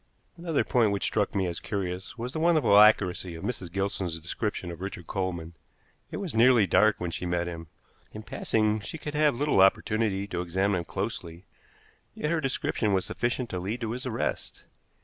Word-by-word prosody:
Another 170 Hz, -3 st, 0 dB
point 120 Hz, -4 st, +3 dB
which 100 Hz, -, -2 dB
struck 105 Hz, -1 st, 0 dB
me 95 Hz, -1 st, +1 dB
as 85 Hz, -2 st, -3 dB
curious 95 Hz, +2 st, -4 dB
was 120 Hz, +2 st, -4 dB
the 160 Hz, -, -4 dB
wonderful 160 Hz, -9 st, +4 dB
accuracy 95 Hz, -4 st, +4 dB
of 80 Hz, -, -9 dB
Mrs. 95 Hz, -8 st, -4 dB
Gilson's 95 Hz, -3 st, -1 dB
description 90 Hz, +2 st, -4 dB
of 85 Hz, +1 st, -9 dB
Richard 95 Hz, -3 st, -6 dB
Coleman. 85 Hz, -4 st, -3 dB, 0.6 s
It -, -, -5 dB
was 195 Hz, -5 st, -4 dB
nearly 115 Hz, -1 st, +5 dB
dark 105 Hz, +4 st, +3 dB
when 90 Hz, -1 st, -3 dB
she 90 Hz, -, -4 dB
met 85 Hz, 0 st, 0 dB
him; 85 Hz, -1 st, -6 dB, 0.4 s
in 110 Hz, -, -8 dB
passing 110 Hz, 0 st, 0 dB
she 105 Hz, +9 st, -7 dB
could 150 Hz, -1 st, -6 dB
have 150 Hz, -3 st, +3 dB
little 145 Hz, -6 st, +2 dB
opportunity 100 Hz, 0 st, +2 dB
to 85 Hz, -, -2 dB
examine 95 Hz, +2 st, 0 dB
him 85 Hz, -, -5 dB
closely, 85 Hz, +3 st, -5 dB, 0.7 s
yet 150 Hz, -, -2 dB
her 165 Hz, -2 st, +1 dB
description 125 Hz, -6 st, 0 dB
was 95 Hz, -1 st, +1 dB
sufficient 120 Hz, 0 st, -2 dB
to 90 Hz, -, -2 dB
lead 105 Hz, +7 st, -4 dB
to 110 Hz, -1 st, -2 dB
his 125 Hz, +2 st, -4 dB
arrest. 120 Hz, -2 st, -3 dB
100 Hz, 190 wpm, -27 LUFS, 90-120 Hz, 0.7 s, nearly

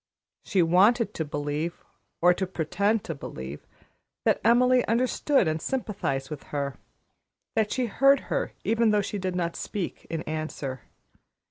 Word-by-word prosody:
She 190 Hz, -4 st, +2 dB
wanted 205 Hz, +8 st, +4 dB
to 160 Hz, -, -2 dB
believe, 150 Hz, +2 st, -3 dB, 0.4 s
or 175 Hz, +1 st, +6 dB
to 190 Hz, +1 st, -2 dB
pretend 190 Hz, +5 st, 0 dB
to 165 Hz, -, -4 dB
believe, 70 Hz, -, -8 dB, 0.6 s
that -, -, +3 dB
Emily 250 Hz, +2 st, +5 dB
understood 250 Hz, -, +2 dB
and 155 Hz, 0 st, -1 dB
sympathized 185 Hz, -, -2 dB
with 150 Hz, -, -5 dB
her, 140 Hz, -2 st, -3 dB, 0.8 s
that 220 Hz, -2 st, +1 dB
she 255 Hz, -, 0 dB
heard 275 Hz, +5 st, +4 dB
her -, -, -2 dB
even 230 Hz, 0 st, +3 dB
though 210 Hz, -1 st, +3 dB
she 205 Hz, +1 st, -4 dB
did 185 Hz, -1 st, -2 dB
not 170 Hz, -1 st, -1 dB
speak 195 Hz, -5 st, -5 dB
in 165 Hz, -1 st, -3 dB
answer. 155 Hz, -5 st, -4 dB
185 Hz, 145 wpm, -27 LUFS, 155-225 Hz, 0.8 s, or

